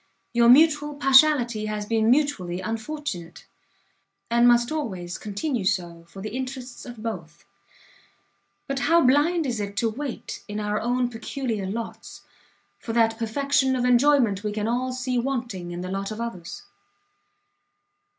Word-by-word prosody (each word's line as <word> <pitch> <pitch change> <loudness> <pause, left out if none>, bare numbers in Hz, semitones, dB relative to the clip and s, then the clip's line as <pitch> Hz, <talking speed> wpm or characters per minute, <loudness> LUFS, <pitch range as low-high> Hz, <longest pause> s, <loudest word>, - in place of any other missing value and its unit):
Your 235 0 +5
mutual 295 +2 +5
partiality 265 -5 +4
has 210 -1 -3
been 220 0 +1
mutually 245 -11 +1
unfortunate, 220 - -5 0.9
and 235 +1 +5
must 240 +1 +4
always 190 - -4
continue 215 +3 -3
so 175 -3 -2
for 190 +3 -10
the 215 +2 -5
interests 255 -1 -6
of 240 -3 -9
both: 170 -8 -6 1.2
but 275 0 -2
how 335 +4 +4
blind 300 +6 +3
is 240 -4 -2
it 200 0 -5
to 225 -1 +1
wait, 270 +2 -6
in 210 0 -4
our 210 0 -1
own 245 +2 +1
peculiar 225 -3 -4
lots, 225 +4 -6 0.6
for 225 - -5
that 225 -1 +2
perfection 265 +3 +1
of 250 -1 0
enjoyment 245 -5 +3
we 210 - -1
can 210 0 -2
all 250 +2 -1
see 255 -1 -1
wanting 235 -8 -3
in 175 0 -5
the 185 0 -5
lot 195 0 -3
of 215 0 -6
others! 185 -8 -6
235 Hz, 145 wpm, -25 LUFS, 205-265 Hz, 1.2 s, Your